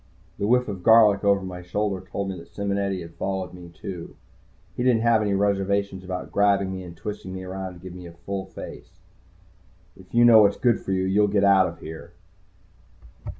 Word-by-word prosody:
The 100 - 0
whiff 125 +2 +3
of 100 -4 -5
garlic 105 -1 +6
over 100 -1 +3
my 90 -1 -7
shoulder 95 +1 -2
told 95 +1 -4
me 95 - -5
that 85 - -13
Simonetti 100 -2 -2
had 85 0 -12
followed 95 0 -3
me, 90 -1 -11
too. 85 +1 -8 0.6
He - - -3
didn't 120 -3 +3
have 115 -2 +4
any 100 -2 0
reservations 100 -1 0
about 90 -1 -6
grabbing 100 -1 +2
me 95 - -5
and 85 -2 -10
twisting 95 -2 -6
me 95 - -6
around 95 0 -6
and 85 - -15
giving 90 -1 -9
me 90 - -9
a 85 - -13
real 100 -1 -3
face - - -10
full. 90 +1 -25
"If 90 - -25
you 120 0 +6
know 115 -2 +8
what's 100 -1 +3
good 120 -3 +2
for - - -5
you, 95 0 +1
you'll 100 +2 +3
get 100 0 +1
out 95 -2 +5
of 85 - -9
here." 80 +1 -9
95 Hz, 205 wpm, -24 LUFS, 90-100 Hz, 0.6 s, know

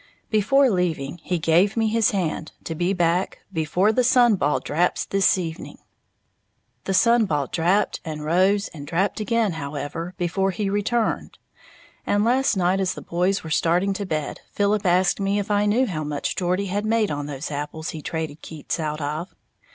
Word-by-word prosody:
Before 265 +6 +4
leaving, 175 -4 -1
he 180 +2 -2
"gave 170 +6 +2
me 225 -1 +2
his 225 0 +2
hand" 165 -5 -2
to 165 - -4
be 175 +3 0
back 175 0 0 0.2
"before 175 +6 +2
the 250 +3 +2
sun 245 -2 +5
ball 150 -7 +1
draps 175 +4 0
this 195 -1 +3
evening." 165 -3 -6 1.1
The 195 - -1
sun 235 +3 +4
ball 150 -6 0
drapped 180 +8 +1
and 155 -2 -6
rose 190 +5 +2
and 145 -3 -10
drapped 185 +7 0
again, 220 0 +1
however, 160 +3 -5
before 190 +2 0
he 195 +1 -2
returned; 215 +3 -1 0.7
and 205 +1 +1
last 255 -2 +2
night 185 +1 +2
as 190 -2 0
the - - -8
boys 180 +3 0
were 160 - -7
starting 175 +5 +2
to 200 0 -4
bed, 155 -4 -3
Philip 205 0 +1
asked 180 +2 +3
me 195 +1 0
if 205 0 -2
I 205 0 +2
knew 235 +6 +3
how 160 -9 -3
much 145 -1 -3
Geordie 185 +2 0
had 200 +2 -2
made 220 -2 +1
on 145 0 -3
those 145 +1 -5
apples 150 +2 -4
he 155 - -7
traded 160 -1 -4
Keats 160 +1 -5
out 155 -1 -3
of. 155 +5 -4
180 Hz, 180 wpm, -23 LUFS, 160-205 Hz, 1.1 s, sun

